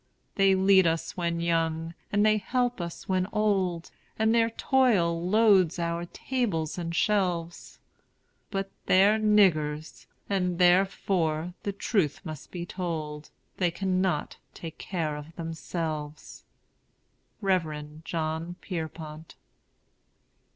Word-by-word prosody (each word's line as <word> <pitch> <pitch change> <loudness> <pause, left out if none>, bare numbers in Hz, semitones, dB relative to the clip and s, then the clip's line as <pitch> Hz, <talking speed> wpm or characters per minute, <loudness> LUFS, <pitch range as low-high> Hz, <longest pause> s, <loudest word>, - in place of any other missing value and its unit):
They 195 -1 +4
lead 190 -1 +5
us 165 0 -1
when 170 -2 -1
young, 165 -1 0 0.2
and 205 0 +3
they 215 0 +4
help 245 -1 -1
us 170 -1 -7
when 185 -1 +1
old, 190 -5 0 0.3
And 220 +1 +3
their 230 -1 +3
toil 215 -10 +2
loads 200 -5 +4
our 170 0 -2
tables 180 - -2
and 170 -1 -4
shelves; 175 -5 0 0.7
But 195 -1 -3 0.2
they're 200 +4 +5
"niggers"; 155 - +2 0.2
and 180 -3 0
therefore 180 -2 +2
(the 200 - -2
truth 195 - 0
must 155 -5 -8
be 175 -1 -5
told) 155 -5 -5 0.3
They 180 -2 +2
cannot 185 -2 -1 0.2
take 160 -2 -8
care 160 -5 -2
of 150 +3 -9
themselves. 160 -2 -5 1.0
REV. 155 -5 -1
JOHN 160 +1 -3
PIERPONT. 160 -3 -7
175 Hz, 110 wpm, -28 LUFS, 160-195 Hz, 1.0 s, lead